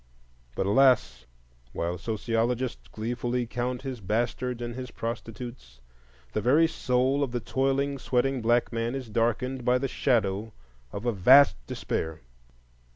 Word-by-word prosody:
But - - -1
alas! 100 - +3 0.5
while 85 +1 -2
sociologists 115 +3 -2
gleefully 120 +2 -2
count 125 +2 -3
his 130 -3 -5
bastards 120 +4 -1
and 120 0 -4
his 125 0 -6
prostitutes, 115 - -7 0.5
the - - 0
very 140 +9 +5
soul 130 -2 +1
of 135 -4 0
the 120 - -1
toiling, 135 +3 0
sweating 130 +1 0
black 120 +1 +2
man 115 +2 -1
is 130 -4 -6
darkened 120 +3 0
by 125 +1 +3
the 135 +2 -1
shadow 110 -3 0 0.4
of 100 - -6
a 120 - +2
vast 130 +8 +7
despair. 80 0 -3
120 Hz, 135 wpm, -27 LUFS, 110-130 Hz, 0.5 s, vast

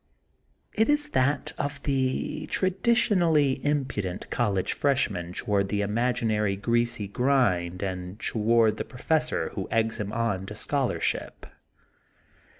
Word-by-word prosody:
It 220 +4 +2
is 295 0 +2
that 140 - +1
of 145 -1 -3
the 135 +2 -1
traditionally 185 - +2
impudent 135 -11 -2
college 100 -6 0
freshman 105 -11 0
toward 100 0 0
the 105 0 0
imaginary 110 -2 0
greasy 120 +1 0
grind 100 -7 +1
and 90 +1 -5
toward 110 0 +2
the - - -2
professor - - -1
who - - -5
eggs 115 0 0
him 105 -1 -3
on 100 -5 -1
to 105 - -7
scholarship. 135 +3 -1
115 Hz, 115 wpm, -27 LUFS, 100-140 Hz, -, It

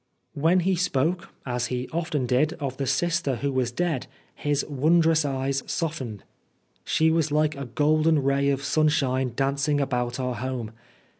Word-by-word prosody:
When 165 +5 +3
he 185 +2 +1
spoke, 175 0 0 0.2
as 125 -1 -1
he 125 0 -3
often 160 -5 -1
did, 130 +6 +2
of 140 -6 -5
the 135 - -2
sister 160 0 +1
who 140 +4 -2
was 130 -2 0
dead, 160 -1 -1 0.3
his 145 -1 -1
wondrous 160 +2 +3
eyes 135 0 -1
softened. 135 - -3 0.3
" - - -44
She 160 0 +2
was 160 -2 +1
like 155 0 +2
a 140 0 -5
golden 155 +3 +2
ray 140 +1 +2
of 140 0 0
sunshine 135 -4 +1
dancing 140 +2 +1
about 125 -2 -1
our 125 -1 -1
home." 120 -1 -4
140 Hz, 160 wpm, -25 LUFS, 130-160 Hz, 0.3 s, When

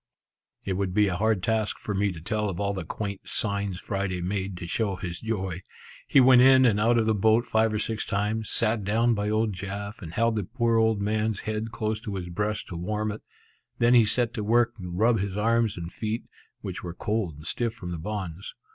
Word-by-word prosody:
It 95 - -1
would 95 -2 -2
be 105 -1 +4
a 90 - -2
hard 105 -1 +1
task 110 0 0
for 105 - -4
me 100 +1 +1
to 85 - -8
tell 105 +4 -1
of 90 - -5
all 100 0 0
the 95 - -4
quaint, 100 -2 -5
signs 100 -3 -1
Friday 95 -3 -2
made 95 +1 -3
to 90 - -6
show 100 +3 -1
his 90 -2 -5
joy. 95 -6 -3 0.5
He - - +5
went 125 -1 +7
in 130 0 +7
and 105 -4 +3
out 115 +2 +3
of 115 - +2
the 110 - +3
boat 110 +3 +3
five 110 0 +2
or 105 - -1
six 110 +1 -2
times, 105 +2 -1
sat 110 -2 0
down 115 +4 +2
by 105 -1 -1
old 110 0 +1
Jaf, 100 +3 -6
and 85 -4 -7
held 115 0 +2
the 105 - 0
poor 115 +3 +1
old 110 -2 +2
man's 110 0 0
head 110 +1 -3
close 110 -1 -2
to 105 -5 -5
his 90 -2 -5
breast 105 +4 -2
to 85 - -5
warm 105 +5 -2
it; 105 - -7 0.6
then 120 +1 +4
he 120 -2 +7
set 120 +2 0
to 110 - -3
work 115 +2 +3
to 90 -3 -7
rub 110 +6 +2
his 100 0 -3
arms 115 -1 +2
and 85 0 -6
feet, 110 +1 -3 0.4
which - - -5
were 85 -1 -6
cold 105 -7 -2
and 75 +2 -12
stiff 115 +5 -1
from 90 -6 -7
the 85 - -4
bonds. 95 -1 -5
105 Hz, 225 wpm, -26 LUFS, 95-110 Hz, 0.6 s, went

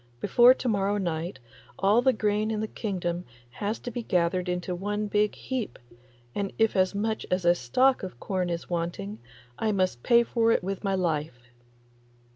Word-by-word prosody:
Before 245 - +6
to 255 - -4
morrow 200 -2 +1
night 170 -5 -3 0.4
all 205 +4 +4
the 260 +1 +4
grain 215 -2 0
in 220 -1 -1
the 220 - -2
kingdom 180 -6 -3 0.3
has 205 - -3
to 245 - -5
be 240 - -4
gathered 180 -2 0
into 180 0 -2
one 205 +4 -2
big 210 0 +1
heap, 250 - -4 0.6
and 200 -1 -2
if 225 -1 +2
as 185 +1 +2
much 220 +2 -1
as 180 -1 0
a 175 - +6
stalk 250 - +2
of 185 -10 -7
corn 185 -2 -2
is 170 -1 -3
wanting 165 - -3 0.4
I 220 - +1
must 185 - 0
pay 235 - +5
for 230 -1 +2
it - - +2
with 195 +2 -4
my 195 -1 +1
life. 150 -9 -2
195 Hz, 180 wpm, -27 LUFS, 175-215 Hz, 0.6 s, Before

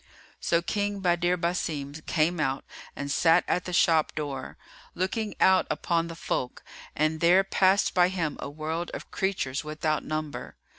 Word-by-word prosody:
So 170 0 +1
King 205 +1 -1
Badr 175 0 +2
Basim 165 -5 -2
came 165 +2 +1
out 135 -2 -1 0.3
and 140 0 -4
sat 165 +4 +4
at 180 - 0
the 180 - -4
shop 165 -3 +3
door, 140 -4 -5 0.4
looking 205 +4 -2
out 190 0 +5
upon 170 -1 0
the 165 - -7
folk; 125 -5 -3 0.3
and 155 +1 +1
there 175 +4 +5
passed 195 0 +3
by 180 -1 +5
him 170 -5 -2
a - - -5
world 160 +3 -4
of - - -9
creatures 185 -9 -1
without 155 0 -1
number. 155 -1 -5
165 Hz, 155 wpm, -27 LUFS, 155-180 Hz, 0.4 s, out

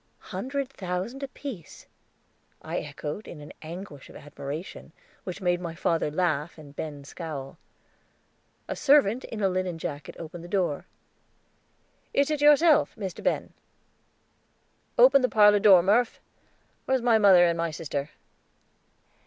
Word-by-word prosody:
"Hundred 265 +8 -3
thousand 195 +2 -5
apiece," 265 - -8 0.8
I - - -3
echoed 150 +6 -6
in 160 - -9
an 150 - -11
anguish 165 -3 -9
of - - -14
admiration, 145 +3 -8 0.3
which 185 +2 -6
made 175 -1 +1
my 170 -2 -5
father 165 -2 0
laugh 160 -1 -1
and 145 -2 -13
Ben 145 -2 -6
scowl. 140 -3 -7 1.1
A - - -3
servant 270 -5 +3
in 220 - -6
a - - +5
linen 185 -2 -2
jacket 145 -2 -6
opened 165 +1 -8
the - - -9
door. 175 -6 -1 1.3
"Is 280 +2 +3
it 300 -2 -1
yourself, 295 +2 +5
Mr. 195 -5 -6
Ben?" - - -1 1.4
"Open 265 +3 +7
the 255 - +2
parlor 210 -1 +6
door, 195 -4 +7
Murph. 220 +5 +2 0.7
Where's 265 -2 +1
my 230 -2 +4
mother 190 -4 +7
and 170 -1 +2
my 165 0 -1
sister?" 150 -2 -4
180 Hz, 135 wpm, -27 LUFS, 155-230 Hz, 1.4 s, Open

